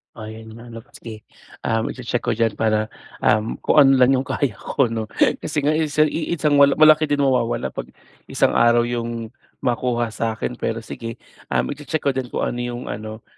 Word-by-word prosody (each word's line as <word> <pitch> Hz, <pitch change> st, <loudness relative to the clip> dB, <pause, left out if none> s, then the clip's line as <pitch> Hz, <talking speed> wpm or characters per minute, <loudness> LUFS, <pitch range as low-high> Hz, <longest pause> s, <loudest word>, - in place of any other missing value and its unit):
Ayan 110 Hz, 0 st, -9 dB
nga 115 Hz, +2 st, -12 dB
'no, 115 Hz, -1 st, -10 dB
sige, 110 Hz, -2 st, -10 dB, 0.4 s
um, 115 Hz, 0 st, 0 dB
i-che-check 120 Hz, -1 st, -3 dB
ko -, -, -1 dB
niyan 115 Hz, -1 st, 0 dB
para, 110 Hz, 0 st, +1 dB, 0.3 s
um, 110 Hz, +1 st, +2 dB
kung -, -, +2 dB
ano 135 Hz, -1 st, +7 dB
lang 130 Hz, 0 st, +5 dB
yung 130 Hz, 0 st, +1 dB
kaya 140 Hz, -5 st, 0 dB
ko 140 Hz, -, 0 dB
'no, 110 Hz, -1 st, -3 dB, 0.3 s
kasi 150 Hz, -2 st, -3 dB
nga 145 Hz, -, +3 dB
iisa 155 Hz, -1 st, +2 dB
iisang 155 Hz, -1 st, 0 dB
mal 140 Hz, -1 st, +6 dB
malaki 155 Hz, 0 st, +6 dB
din 145 Hz, -1 st, +1 dB
mawawala 125 Hz, -3 st, 0 dB
'pag -, -, -6 dB, 0.4 s
isang -, -, +2 dB
araw 120 Hz, 0 st, +4 dB
'yong 115 Hz, -1 st, -4 dB, 0.3 s
makuha 120 Hz, -1 st, 0 dB
sa 110 Hz, 0 st, -2 dB
akin, 120 Hz, +2 st, -5 dB
pero 115 Hz, 0 st, -3 dB
sige, 115 Hz, 0 st, -7 dB, 0.3 s
um, -, -, 0 dB
i-che-check 150 Hz, +2 st, -4 dB
ko 140 Hz, -, +2 dB
din 130 Hz, -1 st, -3 dB
kung -, -, -3 dB
ano 120 Hz, -, -2 dB
'yong 120 Hz, 0 st, -4 dB
ano 110 Hz, +1 st, -7 dB
120 Hz, 190 wpm, -21 LUFS, 115-140 Hz, 0.4 s, ano